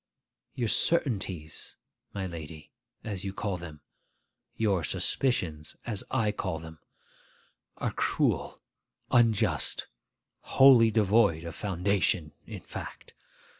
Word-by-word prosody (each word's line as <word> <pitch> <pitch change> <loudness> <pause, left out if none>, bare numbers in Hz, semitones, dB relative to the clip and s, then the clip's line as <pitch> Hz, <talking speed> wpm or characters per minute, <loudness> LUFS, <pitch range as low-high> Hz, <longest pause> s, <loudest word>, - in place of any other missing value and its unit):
'Your 120 -2 -1
certainties, 95 - 0 0.4
my 100 -2 -4
lady, 80 -3 -8 0.3
as 100 -4 -5
you 95 -1 -4
call 100 -1 -3
them, 80 -4 -10 0.8
your 100 -6 +1
suspicions 80 - -1
as 105 -5 -3
I 115 -5 +1
call 95 -5 -3
them, 80 0 -11 1.0
are - - -2
cruel, - - -1 0.5
unjust, 115 -4 +3 0.5
wholly 130 -4 +6
devoid 105 -5 +3
of 85 -1 -6
foundation 95 -4 0 0.2
in - - -8
fact. - - -9
95 Hz, 100 wpm, -28 LUFS, 80-110 Hz, 1.0 s, wholly